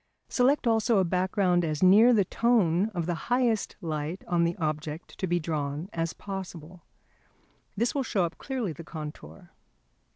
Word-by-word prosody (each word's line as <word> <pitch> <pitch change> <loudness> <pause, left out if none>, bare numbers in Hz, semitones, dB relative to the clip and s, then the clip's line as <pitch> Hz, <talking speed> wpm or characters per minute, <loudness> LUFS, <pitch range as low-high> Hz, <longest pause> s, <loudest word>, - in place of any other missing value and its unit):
Select 270 +3 +2
also 225 -1 +3
a 190 - +4
background 180 0 +1
as 155 0 -1
near 210 +6 +7
the 210 -5 +4
tone 205 -5 +2
of 170 -2 -1
the 175 - -1 0.2
highest 245 -3 +1
light 160 +1 -4
on 170 -1 +2
the 170 - -1
object 155 -1 -4
to 190 - -1
be 175 0 +1
drawn 155 +2 -3
as 165 -1 -1
possible. 180 -3 -8 1.0
This 235 +3 +1
will 280 - 0
show 210 -7 0
up 170 - -7
clearly 250 - -3
the 170 - -10
contour. 150 - -9
180 Hz, 160 wpm, -28 LUFS, 160-215 Hz, 1.0 s, near